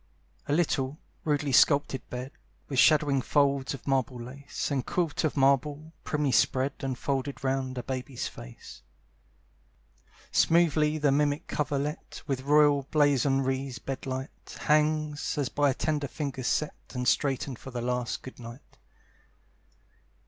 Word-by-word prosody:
A - - -2
little, 145 -4 0 0.3
rudely 145 -2 0
sculptured 140 -2 +3
bed, 125 +2 -5 0.4
With 135 -3 -1
shadowing 145 -3 +5
folds 140 -1 +1
of 130 - -13
marble 130 -2 0
lace, 135 +5 -5
And 135 -3 0
quilt 165 -1 -1
of 155 -2 0
marble, 145 +3 +1
primly 150 -2 0
spread 130 +4 +2
And 130 -2 -3
folded 140 +1 -3
round 130 -1 -1
a 125 - -3
baby's 130 0 -4
face. - - -11 1.5
Smoothly 155 -2 +3
the 145 -2 +2
mimic 145 +1 +1
coverlet, 145 0 -3
With 135 -3 -2
royal 145 -1 +4
blazonries 135 -2 +1
bedight, 135 0 -6
Hangs, 155 0 +1
as 140 -3 0
by 145 -1 +2
tender 145 +2 -1
fingers 135 -2 -4
set 150 +2 0 0.2
And 125 0 -2
straightened 135 -2 0
for - - -9
the 125 -2 -5
last 125 0 -2
good 130 - -10
night. 120 +2 -12
140 Hz, 130 wpm, -28 LUFS, 130-150 Hz, 1.5 s, shadowing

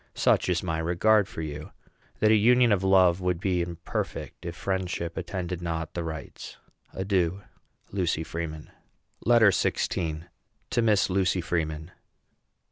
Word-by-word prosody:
Such - - +2
is 90 0 0
my 80 -3 -2
regard 95 +5 +3
for 80 -6 -6
you, 75 0 -7 0.5
that 110 0 +5
a - - +6
union 120 +3 +5
of 100 -2 +2
love 95 -2 +4
would 90 -2 0
be 90 -1 0
imperfect 85 0 -5
if 85 - -5
friendship 90 -3 -3
attended 90 -1 -4
not 80 -1 -3
the 85 - -3
rites. 80 -3 -7 0.3
Adieu. 95 -1 -1 0.5
LUCY 90 -4 0
FREEMAN. 80 -2 -6 0.5
LETTER 115 -3 +6
XVI. 80 -3 -1 0.5
TO 120 - +2
MISS 105 -4 +3
LUCY 95 -1 +1
FREEMAN. 80 -1 -3
90 Hz, 135 wpm, -27 LUFS, 80-95 Hz, 0.5 s, a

